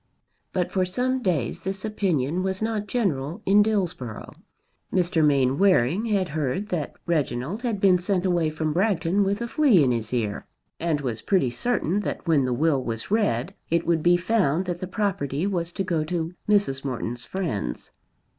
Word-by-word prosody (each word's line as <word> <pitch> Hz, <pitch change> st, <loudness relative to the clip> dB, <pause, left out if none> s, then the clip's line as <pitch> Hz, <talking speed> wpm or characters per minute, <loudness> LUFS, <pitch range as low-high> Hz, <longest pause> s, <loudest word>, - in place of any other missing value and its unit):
But 180 Hz, -2 st, -1 dB
for 185 Hz, -, +1 dB
some 250 Hz, +8 st, -1 dB
days 160 Hz, -, -1 dB
this 190 Hz, +2 st, -5 dB
opinion 180 Hz, -7 st, 0 dB
was 190 Hz, 0 st, -1 dB
not 220 Hz, -1 st, -2 dB
general 165 Hz, -, -1 dB
in 200 Hz, +2 st, +5 dB
Dillsborough. 180 Hz, -, -2 dB, 0.6 s
Mr. 175 Hz, -3 st, +2 dB
Mainwaring 145 Hz, -, +3 dB
had 200 Hz, -5 st, 0 dB
heard 155 Hz, +6 st, -2 dB
that 165 Hz, -7 st, -3 dB
Reginald 150 Hz, -, -1 dB
had 235 Hz, -5 st, -1 dB
been 190 Hz, -2 st, +5 dB
sent 185 Hz, 0 st, 0 dB
away 175 Hz, -4 st, +2 dB
from 155 Hz, 0 st, -2 dB
Bragton 195 Hz, 0 st, +2 dB
with 200 Hz, +4 st, -1 dB
a -, -, -3 dB
flea 240 Hz, -, +4 dB
in 130 Hz, -, +2 dB
his 115 Hz, -2 st, -2 dB
ear, 110 Hz, -5 st, -2 dB, 0.3 s
and 160 Hz, -3 st, 0 dB
was 120 Hz, -5 st, -3 dB
pretty 180 Hz, -11 st, +1 dB
certain 200 Hz, -, 0 dB
that 200 Hz, -, -4 dB
when 150 Hz, -5 st, +3 dB
the 125 Hz, -, -1 dB
will 140 Hz, 0 st, +1 dB
was 115 Hz, -, -4 dB
read 200 Hz, -, +1 dB, 0.2 s
it 170 Hz, +1 st, +1 dB
would 170 Hz, -2 st, +2 dB
be 175 Hz, +2 st, +4 dB
found 180 Hz, -3 st, +1 dB
that 175 Hz, -1 st, -3 dB
the 185 Hz, -, -4 dB
property 180 Hz, -6 st, -1 dB
was 175 Hz, -4 st, -1 dB
to 195 Hz, -, -2 dB
go 170 Hz, -4 st, 0 dB
to 165 Hz, 0 st, -3 dB, 0.2 s
Mrs. 200 Hz, -11 st, +2 dB
Morton's 120 Hz, -3 st, -4 dB
friends. 105 Hz, -, -3 dB
175 Hz, 175 wpm, -25 LUFS, 140-195 Hz, 0.6 s, in